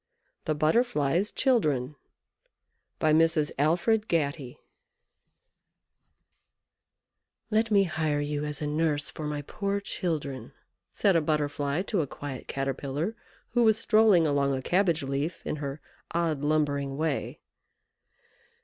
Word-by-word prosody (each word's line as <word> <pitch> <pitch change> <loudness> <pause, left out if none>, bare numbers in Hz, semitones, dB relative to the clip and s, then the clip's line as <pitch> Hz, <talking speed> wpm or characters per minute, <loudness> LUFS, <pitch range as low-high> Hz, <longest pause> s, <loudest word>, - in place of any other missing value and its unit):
THE 155 - 0
BUTTERFLY'S 160 - +1
CHILDREN 150 - +1 1.0
By 155 -1 +2
Mrs. 160 -1 +3
Alfred 180 +9 +2
Gatty 140 -5 -1 2.9
"Let 220 +1 +2
me 200 -2 +5
hire 155 -4 -1
you 145 0 -2
as 150 0 -4
a - - -1
nurse 150 -1 0
for 155 - -5
my 150 -1 -3
poor 200 +6 -2
children," 155 -9 -4 0.4
said 195 -3 +2
a 165 - +4
Butterfly 145 +1 -1
to 200 -3 0
a 145 - -3
quiet 135 -1 -7
Caterpillar, 140 - -3 0.3
who 240 - +1
was 220 -2 +5
strolling 215 -6 +4
along 140 -2 +1
a 130 - -4
cabbage 175 -3 +2
leaf 140 +5 -3
in - - -2
her 140 0 -5 0.4
odd 165 -4 0
lumbering 145 -2 0
way. 155 -2 -2
155 Hz, 120 wpm, -28 LUFS, 145-180 Hz, 2.9 s, me